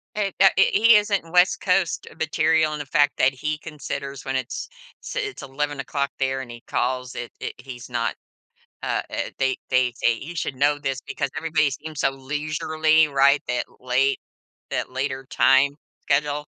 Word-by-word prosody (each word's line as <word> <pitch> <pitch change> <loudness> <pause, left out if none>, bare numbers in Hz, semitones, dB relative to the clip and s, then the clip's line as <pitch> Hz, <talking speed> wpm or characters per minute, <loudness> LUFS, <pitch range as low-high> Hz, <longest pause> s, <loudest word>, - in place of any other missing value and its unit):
He 200 -2 -1
that 195 - +7
h 195 - +5
he 230 +2 +7
isn't 200 -5 0
West 180 0 +4
Coast 185 -2 +1
material 160 0 +2
in - - -4
the 145 - -4
fact 145 0 +2
that 130 - +4
he 150 +4 -3
considers 140 -3 -6
when 135 0 -1
it's 130 -1 -4 0.5
it's 420 -5 -3
11:00 140 0 -2
there 135 0 0
and 125 -2 -7
he 120 0 -9
calls. 125 0 -1
It 120 - -6
it - - -4
he's 125 -3 -9
not, - - -1 0.7
uh, - - 0
er, - - -3
they 130 -1 +1
they 125 -1 +2
they, 120 - +5
usually 155 +4 -4
know 145 +3 +2
this 135 -2 -3
because - - -2
everybody 155 -3 +1
seems 150 +2 -6
so - - +3
leisurely, 155 +3 +1
right, 140 0 +4
that 125 0 -1
late 130 +2 +1 0.5
that - - -2
later 135 0 -3
time 135 +2 +4 0.3
schedule. 145 +1 0
145 Hz, 165 wpm, -23 LUFS, 135-155 Hz, 0.7 s, that